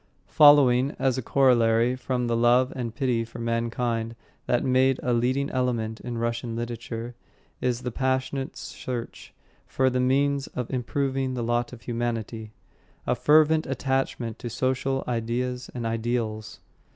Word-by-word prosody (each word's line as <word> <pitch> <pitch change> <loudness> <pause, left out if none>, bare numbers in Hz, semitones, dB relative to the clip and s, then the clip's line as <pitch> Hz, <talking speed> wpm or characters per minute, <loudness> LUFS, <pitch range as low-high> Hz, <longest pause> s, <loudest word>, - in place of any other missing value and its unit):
Following 140 -2 +6
as 130 -1 +1
a - - -2
corollary 120 -2 +3
from 125 -1 -2
the 120 -1 0
love 120 +2 +3
and 120 -3 -4
pity 125 -4 0
for 115 +1 -11
mankind 115 0 -2 0.3
that 120 - +1
make 130 0 +3
a 125 - +1
leading 130 +4 0
element 115 -4 -1
in 120 -1 -5
Russian 115 0 -2
literature, 120 0 -5 0.5
is 125 0 -1
a 125 - -2
passionate 130 +2 -1
search 120 -2 -6 0.4
for 130 0 +1
the 125 - 0
means 140 +2 +1
of 125 +1 -5
improving 130 +1 -1
the 120 - -2
lot 120 +1 0
of 125 -2 -12
humanity, 115 -2 -3 0.5
a - - +2
fervent 155 +5 +4
attachment 130 -3 -2
to 120 - -5
social 130 +3 -1
ideas 125 +2 -2
and 120 -2 -4
ideals. 115 -1 -3
125 Hz, 140 wpm, -26 LUFS, 115-130 Hz, 0.5 s, Following